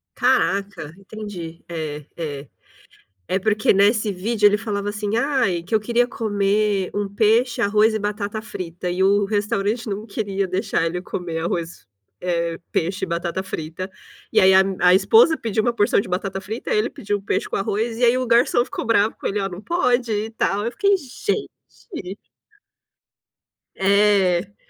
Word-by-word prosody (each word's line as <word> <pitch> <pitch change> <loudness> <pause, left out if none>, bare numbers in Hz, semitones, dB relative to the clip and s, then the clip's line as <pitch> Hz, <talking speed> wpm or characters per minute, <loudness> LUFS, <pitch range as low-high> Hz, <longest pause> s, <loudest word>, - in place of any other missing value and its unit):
Caraca, 200 - 0
entendi. 195 -5 -8
É, 150 -3 -5
é. 145 -4 -5 0.8
É 190 - +1
porque 210 +1 +2
nesse 210 +2 +3
vídeo 210 +3 +1
ele 205 0 +4
falava 205 -2 -3
assim: 210 +1 -2
"Ai, 235 - +1
que 175 - -15
eu 215 - +4
queria 240 +3 +1
comer 205 -3 0
um 205 -1 -1
peixe, 225 +4 +2
arroz 215 +2 +3
e 220 - 0
batata 210 +1 -3
frita" 180 -4 -5
e 180 +2 0
o 200 +1 +3
restaurante 205 +2 -1
não 205 +1 -4
queria 200 -2 -2
deixar 185 -2 0
ele 175 +2 -2
comer 175 -2 -5
arroz, 170 - -4 0.3
eh, 170 -2 -1
peixe 185 +4 -1
e 190 - -8
batata 170 +2 -2
frita. 175 0 -6 0.4
E - - +5
aí, 190 0 +6
a 190 - +7 0.2
a 180 0 +6
esposa 330 - +5
pediu 220 -1 -1
uma 240 +2 +1
porção 220 0 +2
de 195 - -7
batata 195 +1 -3
frita, 220 +5 -4
ele 215 +2 +1
pediu 205 -1 -3
peixe - - -1
com - - -5
arroz 220 +4 -2
e 245 - +2
aí 240 +1 +4
o 255 - -2
garçom 240 +1 +3
ficou - - -5
bravo 220 -1 +2
com - - -7
ele: 205 - -2
"Olha 195 - -1
não 180 - -8
pode 250 -7 +1
e 215 +1 -2
tal", 205 -2 -1
eu 235 - -2
fiquei 400 -1 +3
gente. 320 - -6 1.6
É. 200 -1 +2
205 Hz, 170 wpm, -22 LUFS, 185-220 Hz, 1.6 s, a